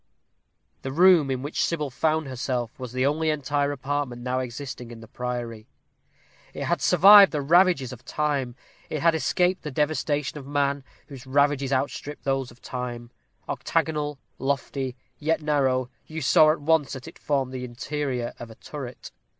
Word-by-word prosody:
The 135 - -4
room 170 -1 +5
in 130 0 -2
which 145 - -2
Sybil 150 -5 -1
found 155 +3 0
herself 125 -2 -3
was 125 -2 -6
the 130 +1 0
only 155 +3 +1
entire 145 -1 0
apartment 140 -3 -3
now 130 +1 -1
existing 125 -1 -6
in 120 -1 -10
the 115 - -12
priory. 120 -3 -5 0.9
It - - -4
had - - 0
survived 195 +3 +8
the 150 - -1
ravages 165 -4 +3
of 125 0 -12
time; 140 -4 -1 0.3
it 155 -1 -3
had 165 -1 +5
escaped 180 +3 +1
the 150 - -5
devastation 150 0 -1
of 135 - -11
man, 140 -1 0 0.2
whose 135 -2 -11
ravages 140 0 +2
outstrip 140 +2 -2
those 135 -2 -1
of 120 - -18
time. 120 -1 -5 0.4
Octagonal, 150 -2 -1 0.2
lofty, 135 -1 -2 0.2
yet 160 +2 +1
narrow, 130 -4 +1 0.2
you 160 +1 -5
saw 155 +1 +5
at 155 - -2
once 160 -1 +2
that 130 -2 -8
it - - -12
formed 135 -3 -1
the 130 -1 -5
interior 125 0 -3
of 120 - -8
a 110 - -12
turret. 130 -2 -8
140 Hz, 165 wpm, -25 LUFS, 125-150 Hz, 0.9 s, survived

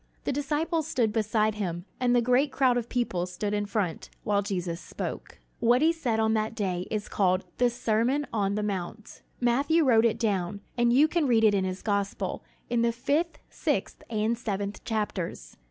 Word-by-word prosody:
The - - -1
disciples 300 +3 -1
stood 230 -8 +1
beside 215 0 +1
him, 175 -4 -4
and 245 -1 +3
the 240 - +4
great 255 +4 +3
crowd 260 -2 +3
of 240 -1 -2
people 190 -8 -1
stood 205 +3 -3
in 205 0 -1
front, 200 -6 -2
while 205 -1 +2
Jesus 180 -4 -3
spoke. - - -6 0.2
What 245 +4 +4
he 325 - +5
said 245 -9 -1
on 220 0 +2
that 220 0 -1
day 185 -5 -2
is 210 -1 -2
called 185 -1 +1
"The 245 0 +4
Sermon 240 +5 +1
on 200 -2 +1
the 210 - -1
Mount." 200 +1 -5 0.2
Matthew 280 +7 +3
wrote 230 -3 +5
it 225 -1 +2
down, 200 -4 -1
and 240 -1 +3
you 280 +5 +6
can 320 -2 +1
read 230 -3 +4
it 215 -2 +6
in 195 -2 +1
his 185 0 -4
gospel, 200 -2 -1 0.2
in 240 -1 +1
the 235 0 +3
fifth, 285 +8 0
sixth, - - -2
and 220 +1 +1
seventh 205 -3 -4
chapters. 195 - -3
220 Hz, 185 wpm, -28 LUFS, 200-245 Hz, 0.2 s, you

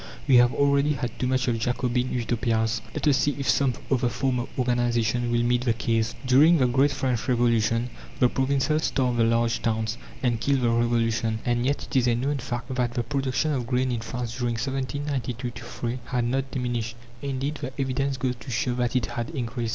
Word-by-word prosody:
We 130 -3 +6
have 120 0 +6
already 140 +1 +2
had 120 -3 -4
too 125 - 0
much 130 0 +1
of 115 -2 +1
Jacobin 125 +1 0
Utopias! 115 -2 0
Let - - -1
us 140 -2 +5
see 145 +1 +1
if 140 - -3
some 135 -3 +2 0.2
other 125 -2 +2
form 125 +2 0
of 120 - -4
organization 120 -1 +1
will 120 0 +2
meet 120 +1 +1
the 120 -3 +2
case. 115 0 0
During 145 +7 +6
the 130 - +3
great 135 +3 +3
French 130 -4 -1
Revolution, 115 -1 +2 0.3
the 125 - +5
provinces 140 +4 +1
starved 125 -3 0
the - - +5
large 115 0 +2
towns, 110 0 -1 0.2
and 120 -3 +1
killed 140 -2 +2
the 120 -1 +2
Revolution. 115 -1 +1
And 120 +1 +1
yet 140 - 0
it - - -8
is 125 -2 +4
a 120 - +3
known 140 +4 -1
fact 125 +1 -4
that 125 -1 -1
the 120 - 0
production 135 +4 -1
of 125 -5 -2
grain 130 +1 +1
in 120 - -1
France 120 0 -4
during 120 -2 -1
1792 130 -1 -3
3 120 +1 -4
had 125 -2 -1
not 135 +2 -1
diminished; 120 -3 -3 0.3
indeed, 140 +2 -3
the 130 - -4
evidence 135 0 -1
goes 125 -1 -1
to 120 - -10
show 125 +1 0
that 125 0 -1
it 125 - +2
had 120 -1 -4
increased. 120 -5 -3
125 Hz, 205 wpm, -25 LUFS, 120-130 Hz, 0.3 s, We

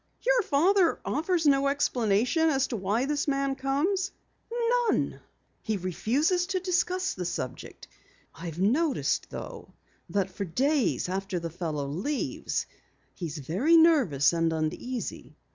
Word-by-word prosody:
"Your - - +4
father 360 +2 +3
offers 325 +2 0
no 275 -1 +4
explanation 255 +2 +2
as 270 -3 +2
to 240 - -2
why 210 +5 0
the 290 0 0
man 275 -1 +1
comes?" 290 +9 0 0.8
"None. - - 0 0.4
He 215 -1 -1
refuses 275 - 0
to 385 -1 -1
discuss 365 0 0
the 185 - -5
subject. 130 -7 -5 0.5
I've 165 -1 -7
noticed, 265 - +1
though, - - -8 0.3
that 195 -2 0
for 200 - -4
days 265 - +1
after 195 +1 -3
the 165 -1 -5
fellow 155 -4 -3
leaves 195 - -2 0.5
he's 165 -3 -5
very 190 - +3
nervous 265 - +4
and 165 -1 +1
uneasy." 160 +11 -4
265 Hz, 125 wpm, -28 LUFS, -, 0.8 s, Your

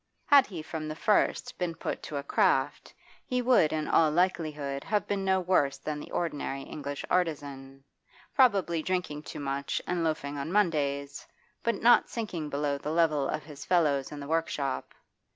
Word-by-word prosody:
Had 285 -3 +6
he 170 -6 -7
from 155 -1 -5
the 155 - -4
first 215 +7 +1
been 175 -2 -2
put - - -4
to 150 - -5
a 140 - -3
craft, 135 0 +1 0.3
he 250 - -1
would 245 -11 +4
in 155 -1 -1
all 160 -1 +4
likelihood 150 -5 -1
have 210 -2 0
been 200 -1 -2
no 190 0 +2
worse 175 -7 +2
than 150 -1 -4
the - - -9
ordinary 145 -4 -3
English 145 -1 -6
artisan 140 -6 -2 0.5
probably 195 - +3
drinking 180 -4 -2
too 150 - -8
much 140 0 -2
and 175 -1 -1
loafing 145 -3 -2
on 140 +4 -4
Mondays, 145 -8 0 0.3
but 235 -1 -1
not 240 +1 +6
sinking 180 -10 -4
below 145 0 -1
the 150 - -5
level 155 -4 +2
of 155 - -2
his 145 -2 -10
fellows 150 -6 +2
in 150 - -7
the 140 - -7
workshop. 155 -4 -2
155 Hz, 170 wpm, -29 LUFS, 140-180 Hz, 0.5 s, Had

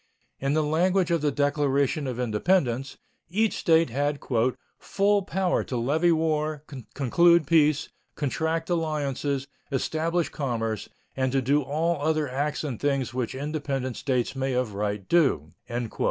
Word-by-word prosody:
In 135 +2 0
the 155 - +2
language 175 +4 +2
of 170 -2 +2
the 150 - +2
Declaration 145 0 +1
of 125 -1 -4
Independence, 125 - 0 0.3
each 215 +4 +1
State 165 -5 +3
had 145 +3 0 0.6
"full 200 +1 +2
power 190 -1 0
to 125 - -3
levy 155 +9 +2
war, 155 -2 0 0.3
conclude 170 +5 +4
peace, 150 -1 +3 0.3
contract 160 +4 -1
alliances, 145 -4 -1 0.3
establish 160 +5 0
commerce, 115 -6 -3 0.3
and 130 -1 0
to 135 - +2
do 145 +4 +3
all 155 +3 -1
other 155 0 +1
acts 145 +4 -2
and 135 -7 -4
things 140 -4 0
which 125 -1 -2
independent 140 -3 -3
states 125 -1 -1
may 135 0 -1
of 125 -4 -1
right 100 -1 -3
do." 135 - +2
145 Hz, 140 wpm, -26 LUFS, 130-160 Hz, 0.6 s, conclude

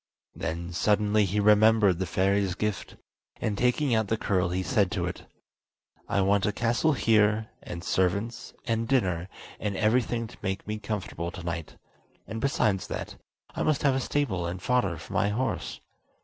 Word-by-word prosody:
Then 85 +2 -4
suddenly 105 +2 +3
he 100 +3 -1
remembered 105 -2 +5
the 95 - -1
fairy's 95 +1 +1
gift, 105 -1 -3 0.4
and 105 - -1
taking 125 +4 +2
out 110 -2 +2
the 110 - 0
curl 90 -4 +1
he 90 +1 -1
said 105 -4 +2
to - - -1
it: - - -6 0.8
"I 100 - +2
want 100 +1 +2
a - - +2
castle 120 +8 +1
here, 110 -3 +3
and 85 0 -7
servants, 100 +7 -1
and 115 -2 0
dinner, 95 -9 +1 0.3
and 100 -2 -2
everything 115 +1 +1
to 110 - -12
make 95 0 -3
me 105 0 -3
comfortable 100 -6 -4
tonight; 85 -2 -6 0.5
and 110 0 -5
besides 110 -8 +1
that, - - -5 0.4
I - - -3
must 155 -3 +1
have 140 -2 +4
a 130 - +1
stable 120 -10 -1
and 90 +2 -4
fodder 100 -5 +1
for - - -10
my 100 - +2
horse." 125 +5 -2
105 Hz, 165 wpm, -27 LUFS, 95-115 Hz, 0.8 s, remembered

